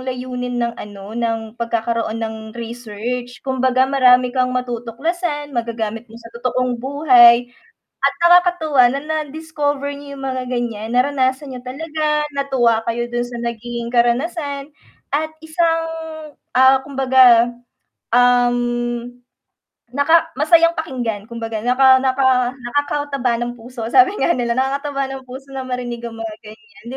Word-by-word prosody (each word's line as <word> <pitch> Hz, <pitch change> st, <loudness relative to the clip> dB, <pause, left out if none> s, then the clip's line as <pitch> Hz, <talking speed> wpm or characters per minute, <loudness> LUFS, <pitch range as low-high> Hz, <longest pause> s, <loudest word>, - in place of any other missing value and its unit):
layunin 250 Hz, -1 st, -4 dB
ng 235 Hz, 0 st, -1 dB
ano, 205 Hz, 0 st, -9 dB
ng 225 Hz, -2 st, -2 dB
pagkakaroon 230 Hz, -1 st, -1 dB
ng 220 Hz, 0 st, -3 dB, 0.2 s
research, 240 Hz, +1 st, -6 dB
kumbaga 260 Hz, -1 st, +2 dB
marami 255 Hz, -2 st, +4 dB
kang 255 Hz, -1 st, +2 dB
matutuklasan, 285 Hz, +6 st, -3 dB
magagamit 230 Hz, -1 st, -3 dB
mo 225 Hz, -, -13 dB
sa 230 Hz, -1 st, -13 dB
totoong 250 Hz, 0 st, -1 dB
buhay 250 Hz, -3 st, +6 dB, 0.6 s
at 275 Hz, 0 st, +3 dB
nakakatuwa 345 Hz, -6 st, +5 dB
na 275 Hz, -, -2 dB
na-discover 300 Hz, -2 st, -3 dB
niyo 280 Hz, 0 st, -9 dB
yung 270 Hz, -, -8 dB
mga 260 Hz, -1 st, -2 dB
ganyan, 235 Hz, -3 st, -3 dB
naranasan 265 Hz, +1 st, +1 dB
niyo 250 Hz, -, -7 dB
talaga, 300 Hz, +2 st, -2 dB
natuwa 255 Hz, -5 st, +2 dB
kayo 240 Hz, +1 st, -1 dB
dun 240 Hz, 0 st, 0 dB
sa 245 Hz, 0 st, -8 dB
naging 235 Hz, 0 st, -4 dB
karanasan 280 Hz, +4 st, 0 dB, 0.5 s
at 310 Hz, +2 st, -1 dB
isang, 330 Hz, +1 st, 0 dB, 0.7 s
ah, 260 Hz, +1 st, +6 dB
kumbaga, 260 Hz, -4 st, +5 dB, 0.7 s
um, 245 Hz, -1 st, +2 dB, 0.8 s
naka 320 Hz, +5 st, +3 dB
masayang 335 Hz, +3 st, +4 dB
pakinggan 240 Hz, -9 st, -3 dB
kumbaga 225 Hz, -1 st, -5 dB
naka 260 Hz, +1 st, +5 dB
naka 260 Hz, -1 st, +2 dB
nakakataba 275 Hz, -1 st, -2 dB
ng 240 Hz, 0 st, -4 dB
puso, 230 Hz, -1 st, -7 dB
sabi 380 Hz, +7 st, +5 dB
nga -, -, +3 dB
nila 240 Hz, -1 st, 0 dB
nakakataba 275 Hz, +2 st, -1 dB
ng 270 Hz, -1 st, -7 dB
puso 265 Hz, +2 st, -10 dB
na 265 Hz, -1 st, -5 dB
marinig 245 Hz, -2 st, -4 dB
ang 235 Hz, -, -6 dB
mga 225 Hz, -1 st, -5 dB
ganyan, 215 Hz, 0 st, -15 dB
255 Hz, 130 wpm, -19 LUFS, 235-280 Hz, 0.8 s, buhay